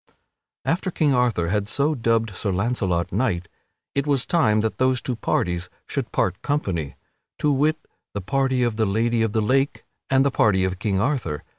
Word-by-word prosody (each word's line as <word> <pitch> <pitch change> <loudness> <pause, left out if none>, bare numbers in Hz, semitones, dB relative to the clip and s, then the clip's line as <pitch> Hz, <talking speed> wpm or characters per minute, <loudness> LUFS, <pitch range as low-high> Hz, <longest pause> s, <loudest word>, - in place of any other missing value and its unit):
After 180 +3 0
King 155 -5 +2
Arthur 120 -9 +1
had 105 +1 0
so 145 +7 +1
dubbed 115 -4 +1
Sir 100 - -1
Launcelot 95 -3 0
knight, 95 -5 0 0.5
it 140 +1 -1
was 140 -3 +2
time 110 -11 +3
that 110 0 -2
those 130 -1 +3
two 125 - -3
parties 90 -5 -1 0.2
should - - -4
part 95 -1 0
company 95 - -2 0.4
to 150 - +2
wit, 150 +3 +2 0.4
the 100 - -2
party 130 +3 +1
of 120 -3 0
the 110 -2 +2
Lady 115 +3 +1
of 110 -2 0
the 110 - +2
Lake 135 +5 +1 0.3
and 135 0 +4
the 140 - +2
party 95 -6 +3
of 95 -1 -2
King 100 -2 0
Arthur. 105 - -1
115 Hz, 180 wpm, -23 LUFS, 95-135 Hz, 0.5 s, and